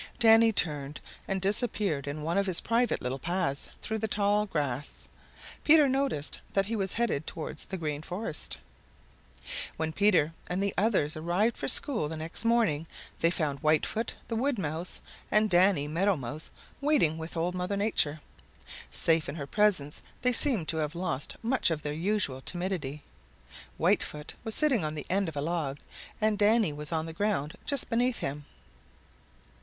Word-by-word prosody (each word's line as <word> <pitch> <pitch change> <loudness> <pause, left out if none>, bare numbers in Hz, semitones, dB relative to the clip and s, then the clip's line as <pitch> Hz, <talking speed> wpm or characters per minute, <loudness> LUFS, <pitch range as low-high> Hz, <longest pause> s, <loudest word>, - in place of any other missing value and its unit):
Danny 225 -1 +6
turned 150 -7 0 0.3
and 195 0 -1
disappeared 195 - +1
in 150 +1 -4
one 165 +2 -1
of 200 0 +1
his 180 -3 +3
private 235 - +1
little 130 +2 -3
paths 160 -3 0 0.2
though 220 0 -2
the 220 - 0
tall 210 0 +1
grass. 145 -6 -3 0.6
Peter 305 -1 +7
noticed 265 - -1
that 195 0 +2
he 225 +3 -3
was 195 -3 -2
headed 220 -10 -1
towards 160 - -4
the 190 - -5
Green 150 -3 -3
Forest. 180 -1 -4 1.2
When 160 0 -2
Peter 180 -5 +3
and 180 - -2
the 200 - 0
others 195 -7 +1
arrived 175 +9 +1
for - - -4
school 250 - +5
the 160 - -4
next 160 +6 -5
morning 220 -10 +2 0.3
they 165 - +3
found 150 -5 -1
Whitefoot 155 - 0
the 230 - -3
Wood 260 +3 +1
Mouse 165 0 -3 0.3
and 215 -1 +3
Danny 175 -4 +4
Meadow 180 +5 +1
Mouse 140 +4 -5 0.3
waiting 275 - +2
with 160 +1 -7
Old 175 +2 0
Mother 180 +2 -2
Nature. 160 -8 +1 0.7
Safe 165 -1 +2
in - - -5
her 145 -4 -5
presence, 180 -5 +1 0.2
they 250 0 +3
seemed 235 - +3
to 160 - 0
have 155 +1 -2
lost 170 -5 -3
much 250 -2 +3
of 155 -3 -2
their 150 - -2
usual 165 -5 -1
timidity. 175 -5 -3 0.7
Whitefoot 150 0 0
was 220 -2 0
sitting 270 - +3
on 155 0 -3
the 150 - -5
end 195 -2 +1
of 150 - -8
a - - 0
log 155 -3 -2 0.4
and 215 -2 +1
Danny 210 -5 +4
was 150 +2 -5
on 160 -1 -1
the 165 - -6
ground 165 -6 -1
just 280 -3 0
beneath 245 +1 +1
him. 145 +1 -4
175 Hz, 170 wpm, -29 LUFS, 150-215 Hz, 1.2 s, Peter